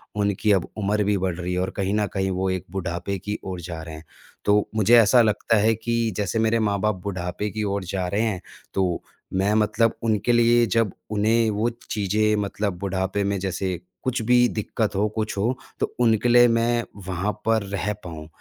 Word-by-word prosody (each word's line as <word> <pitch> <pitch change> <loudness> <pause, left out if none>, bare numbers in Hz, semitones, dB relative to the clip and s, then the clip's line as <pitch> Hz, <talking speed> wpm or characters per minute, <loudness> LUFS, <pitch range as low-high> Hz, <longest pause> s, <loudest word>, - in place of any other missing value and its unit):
उनकी 100 0 +1
अब 95 -3 +2
उम्र 105 0 +1
भी 105 0 +1
बढ़ 95 -2 -1
रही 90 0 -3
है 90 - 0
और 95 - -1
कहीं 100 0 -1
न 105 0 +2
कहीं 95 -1 0
वो 95 +1 -1
एक 95 -2 -2
बुढ़ापे 95 +1 -3
की 105 +3 -4
ओर 95 -2 -5
जा 85 -1 -6
रहे 80 -1 -8
हैं। 80 - -11 0.4
तो 105 0 +3
मुझे 110 +2 +5
ऐसा 120 +3 +6
लगता 110 0 +2
है 110 +2 +4
कि 115 +2 -1 0.2
जैसे 105 +1 -1
मेरे 110 +1 +2
माँ-बाप 105 -1 +1
बुढ़ापे 95 +1 -3
की 110 +1 -3
ओर 100 -1 -1
जा 90 0 -2
रहे 100 +4 0
हैं 105 -6 -1 0.3
तो 90 -3 0 0.3
मैं 95 +3 +2
मतलब 110 +1 +2
उनके 110 +1 +1
लिए 120 0 +5
जब 115 -3 +1 0.2
उन्हें 110 +2 +2
वो 105 +3 0 0.2
चीज़ें 105 +1 +1
मतलब 100 -2 -2
बुढ़ापे 95 +1 -1
में 100 0 0
जैसे 95 -1 -2 0.2
कुछ 130 -1 -1
भी 125 +2 +5
दिक़्कत 110 -2 -2
हो, 105 +2 +2
कुछ 105 -1 -3
हो 120 +6 0 0.2
तो - - -2
उनके 115 0 +3
लिए 120 0 +7
मैं 115 0 +2 0.2
वहाँ 95 +3 -1
पर 110 -2 +2
रह 100 +1 -2
पाऊँ 80 -3 -8
105 Hz, 200 wpm, -24 LUFS, 95-110 Hz, 0.4 s, लिए